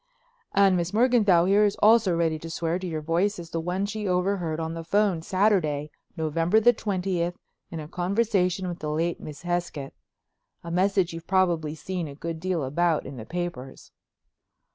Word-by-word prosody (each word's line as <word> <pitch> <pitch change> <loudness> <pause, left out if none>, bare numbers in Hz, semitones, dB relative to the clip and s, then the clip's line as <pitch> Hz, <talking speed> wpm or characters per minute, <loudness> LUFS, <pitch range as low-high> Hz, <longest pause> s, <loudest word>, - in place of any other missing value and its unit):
"And 195 -1 +5
Miss 175 +1 -1
Morganthau 215 -7 +4
here 200 +3 +4
is 205 -1 +2
also 215 -5 +4
ready 160 -2 0
to 165 - -8
swear 165 +2 -2
to 185 - -5
your 160 -2 -3
voice 175 +6 +1
as 170 -2 -9
the 165 - -2
one 180 +4 -1
she 210 0 -4
overheard 180 -3 0
on 160 0 -3
the 165 0 -6
phone 195 -1 +1
Saturday, 165 -6 +1 0.3
November 165 +6 +2
the 240 +2 +5
twentieth, 180 -5 -2 0.3
in 165 - -6
a 150 - -7
conversation 185 0 0
with 175 -1 -5
the 155 - -4
late 165 +3 -1
Miss 150 0 -9
Hesketh—a 170 -1 -7
message 185 0 +1
you've 165 0 -8
probably 170 -5 +1
seen 175 +2 -4
a 140 - -9
good 165 +2 -5
deal 180 -3 -1
about 160 +4 +1
in 135 -1 -8
the 110 - -8
papers." 170 -7 -6
175 Hz, 175 wpm, -26 LUFS, 160-195 Hz, 0.3 s, And